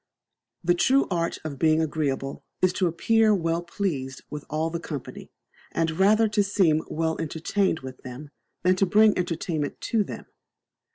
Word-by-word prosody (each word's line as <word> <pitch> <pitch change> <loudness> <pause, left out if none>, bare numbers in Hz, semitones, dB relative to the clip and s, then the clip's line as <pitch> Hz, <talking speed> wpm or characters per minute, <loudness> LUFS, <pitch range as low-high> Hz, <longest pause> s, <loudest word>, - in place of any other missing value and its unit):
The 175 +1 +4
true 265 +10 +3
art 170 -1 0
of 145 -4 -6
being 155 -1 +4
agreeble 145 -3 -2 0.2
is 185 - +3
to 185 - +1
appear 220 +5 +3
well 165 -2 0
pleased 170 -7 -3
with 150 -1 -6
all 155 +2 -1
the 170 - -3
company, 145 -5 -7 0.4
and 165 -1 +1
rather 215 +3 +5
to 210 -1 +2
seem 185 -6 +2
well 160 +1 -1
entertained 165 +3 -1
with 130 -1 -9
them 130 +3 -9 0.3
than 185 +1 +4
to 195 - +3
bring 215 +2 +5
entertainment 165 -4 -2
to 225 -3 +1
them. - - -8
165 Hz, 160 wpm, -25 LUFS, 155-195 Hz, 0.4 s, rather